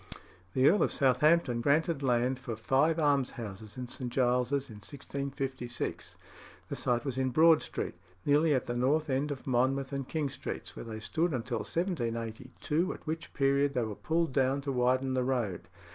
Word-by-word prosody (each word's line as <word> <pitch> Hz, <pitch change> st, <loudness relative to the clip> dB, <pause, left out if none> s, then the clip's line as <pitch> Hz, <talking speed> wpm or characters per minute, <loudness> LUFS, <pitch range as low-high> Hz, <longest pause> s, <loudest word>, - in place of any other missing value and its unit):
The 130 Hz, +1 st, +5 dB
Earl 205 Hz, +7 st, +5 dB
of -, -, +2 dB
Southampton 135 Hz, -1 st, +3 dB
granted 150 Hz, +3 st, +2 dB
land 125 Hz, 0 st, +1 dB
for 120 Hz, -4 st, -5 dB
five 135 Hz, +8 st, +2 dB
almshouses 120 Hz, -8 st, -1 dB
in 125 Hz, -1 st, -4 dB
St. 125 Hz, 0 st, -5 dB
Giles's 125 Hz, +2 st, +1 dB
in 110 Hz, -, -11 dB
1656. 135 Hz, +1 st, -5 dB, 0.5 s
The -, -, -3 dB
site 120 Hz, +1 st, 0 dB
was 135 Hz, -2 st, -2 dB
in 130 Hz, 0 st, +1 dB
Broad 160 Hz, +4 st, +6 dB
Street, -, -, -4 dB, 0.3 s
nearly 150 Hz, +1 st, +4 dB
at 130 Hz, -, -1 dB
the 120 Hz, -, -3 dB
north 145 Hz, +5 st, +1 dB
end 135 Hz, +3 st, 0 dB
of 140 Hz, -2 st, -5 dB
Monmouth 135 Hz, +2 st, +1 dB
and 135 Hz, -1 st, -3 dB
King 150 Hz, -4 st, -2 dB
Streets, 140 Hz, 0 st, -6 dB
where -, -, -7 dB
they 110 Hz, -1 st, -6 dB
stood 165 Hz, +8 st, 0 dB
until 120 Hz, -1 st, -2 dB
1782, 130 Hz, -, -2 dB
at -, -, -15 dB
which 160 Hz, 0 st, -4 dB
period 140 Hz, 0 st, +2 dB
they 125 Hz, -, +2 dB
were 110 Hz, -1 st, -3 dB
pulled 160 Hz, +5 st, -1 dB
down 135 Hz, 0 st, +2 dB
to 140 Hz, 0 st, -3 dB
widen 130 Hz, +1 st, +1 dB
the 130 Hz, -1 st, +1 dB
road. 120 Hz, -8 st, -1 dB
135 Hz, 175 wpm, -31 LUFS, 125-145 Hz, 0.5 s, Broad